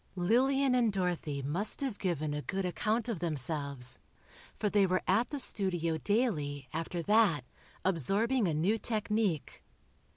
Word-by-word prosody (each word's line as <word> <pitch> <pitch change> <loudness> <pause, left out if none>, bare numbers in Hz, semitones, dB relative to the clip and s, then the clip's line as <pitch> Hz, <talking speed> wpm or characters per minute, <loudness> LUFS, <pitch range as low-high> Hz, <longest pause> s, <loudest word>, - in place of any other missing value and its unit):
Lillian 255 +8 +2
and 240 -3 +3
Dorothy 175 -7 -2
must 175 - -1
have 260 -7 -3
given 155 -5 -1
a 150 - -3
good 190 +5 -3
account 215 +6 -1
of 225 -8 -2
themselves, 140 -5 -2 0.6
for 210 - -1
they 200 -1 +3
were 185 0 0
at 210 +6 +2
the 290 - -4
studio 175 - +1
daily, 150 - -1
after 165 +2 -3
that, 200 - +3 0.4
absorbing 200 - +2
a 165 - 0
new 195 +9 +1
technique. 210 -7 -1
185 Hz, 140 wpm, -31 LUFS, 155-220 Hz, 0.6 s, and